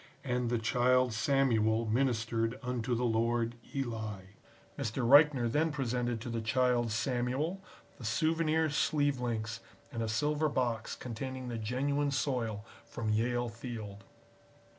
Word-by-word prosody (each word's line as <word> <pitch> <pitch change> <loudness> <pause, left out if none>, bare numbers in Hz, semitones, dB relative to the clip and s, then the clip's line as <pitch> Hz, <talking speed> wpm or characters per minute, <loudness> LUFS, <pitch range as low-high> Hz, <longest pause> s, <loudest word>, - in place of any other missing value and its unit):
And 125 -2 -1
The 120 - +1
Child 125 +2 +2
Samuel 115 -2 +2
ministered 115 -1 0
unto 125 -1 -1
the 120 - -1
Lord 115 0 +1 0.2
Eli." 110 -7 -4 0.4
Mr. 115 +2 -2
Reichner 140 -2 +6
then 155 +7 +1
presented 125 -4 -1
to 120 - -5
the 115 -1 -2
Child 120 0 +2
Samuel 130 - -1 0.4
the - - -9
souvenir 160 +5 +1
sleeve 145 -2 +1
links 115 -3 -2 0.3
and 115 - -4
a 115 - -1
silver 150 +7 +1
box 120 -5 -1
containing 130 +2 -5
the 115 -1 -4
genuine 140 +6 0
soil 125 -7 -1 0.2
from 110 -2 -3
Yale 120 +2 +1
Field. 115 -4 -7
120 Hz, 130 wpm, -32 LUFS, 115-135 Hz, 0.4 s, Reichner